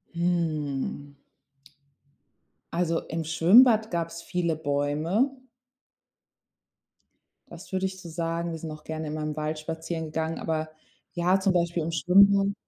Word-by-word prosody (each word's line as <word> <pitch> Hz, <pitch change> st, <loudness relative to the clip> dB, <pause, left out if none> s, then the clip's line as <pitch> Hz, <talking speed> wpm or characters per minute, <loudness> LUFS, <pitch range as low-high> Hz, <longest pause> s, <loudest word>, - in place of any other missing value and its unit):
Hm. 155 Hz, -5 st, -2 dB, 1.6 s
Also, 170 Hz, -1 st, 0 dB
im 165 Hz, 0 st, -3 dB
Schwimmbad 215 Hz, +9 st, +5 dB
gab's 170 Hz, -1 st, -3 dB
viele 170 Hz, -2 st, -1 dB
Bäume. 155 Hz, -, 0 dB, 2.2 s
Das -, -, -12 dB
würde 190 Hz, 0 st, 0 dB
ich 190 Hz, 0 st, -4 dB
so 170 Hz, -, -9 dB
sagen. 170 Hz, +1 st, -2 dB
Wir 165 Hz, -, -4 dB
sind 160 Hz, 0 st, -6 dB
auch 155 Hz, 0 st, -10 dB
gerne 160 Hz, 0 st, -5 dB
in 150 Hz, -, -4 dB
meinem 155 Hz, -1 st, -3 dB
Wald 155 Hz, 0 st, -3 dB
spazieren 160 Hz, +1 st, -4 dB
gegangen, 160 Hz, +1 st, -3 dB
aber 155 Hz, -1 st, -2 dB, 0.4 s
ja, 180 Hz, +2 st, +2 dB
zum 190 Hz, 0 st, +2 dB
Beispiel 170 Hz, -1 st, 0 dB
im 165 Hz, -, -3 dB
Schwimmen. 195 Hz, +5 st, +4 dB
165 Hz, 130 wpm, -26 LUFS, 155-180 Hz, 2.2 s, Schwimmbad